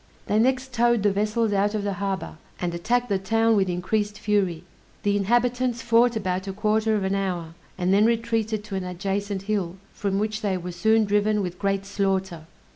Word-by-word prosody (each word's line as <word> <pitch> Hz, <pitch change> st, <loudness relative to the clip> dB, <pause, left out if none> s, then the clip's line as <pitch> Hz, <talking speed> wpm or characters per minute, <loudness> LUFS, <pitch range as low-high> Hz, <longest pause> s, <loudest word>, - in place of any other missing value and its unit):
They 210 Hz, -, +1 dB
next 260 Hz, +2 st, +1 dB
towed 240 Hz, -2 st, +3 dB
the 205 Hz, -, +4 dB
vessels 210 Hz, +2 st, 0 dB
out 205 Hz, +2 st, +1 dB
of 210 Hz, -, -1 dB
the 200 Hz, -1 st, -1 dB
harbor, 195 Hz, -4 st, -3 dB, 0.2 s
and 175 Hz, -1 st, -2 dB
attacked 240 Hz, +8 st, 0 dB
the 200 Hz, -3 st, 0 dB
town 225 Hz, +3 st, +2 dB
with 195 Hz, -2 st, +2 dB
increased 205 Hz, +4 st, -1 dB
fury. 190 Hz, -6 st, 0 dB, 0.4 s
The 205 Hz, 0 st, +2 dB
inhabitants 240 Hz, +3 st, +1 dB
fought 235 Hz, +1 st, +4 dB
about 190 Hz, -2 st, -2 dB
a 195 Hz, -, -3 dB
quarter 215 Hz, +1 st, +1 dB
of 205 Hz, -, 0 dB
an 190 Hz, 0 st, 0 dB
hour, 180 Hz, -4 st, -2 dB, 0.2 s
and 180 Hz, +1 st, +1 dB
then 210 Hz, +3 st, +5 dB
retreated 225 Hz, -2 st, 0 dB
to 210 Hz, -2 st, -6 dB
an 190 Hz, -, -2 dB
adjacent 195 Hz, +2 st, -3 dB
hill, 195 Hz, -4 st, -2 dB, 0.2 s
from 195 Hz, -1 st, -1 dB
which 215 Hz, +1 st, -1 dB
they 195 Hz, -3 st, 0 dB
were 180 Hz, 0 st, -6 dB
soon 220 Hz, +4 st, +3 dB
driven 210 Hz, 0 st, +1 dB
with 180 Hz, -1 st, -5 dB
great 195 Hz, -1 st, 0 dB
slaughter. 190 Hz, -4 st, -2 dB
205 Hz, 195 wpm, -25 LUFS, 190-220 Hz, 0.4 s, then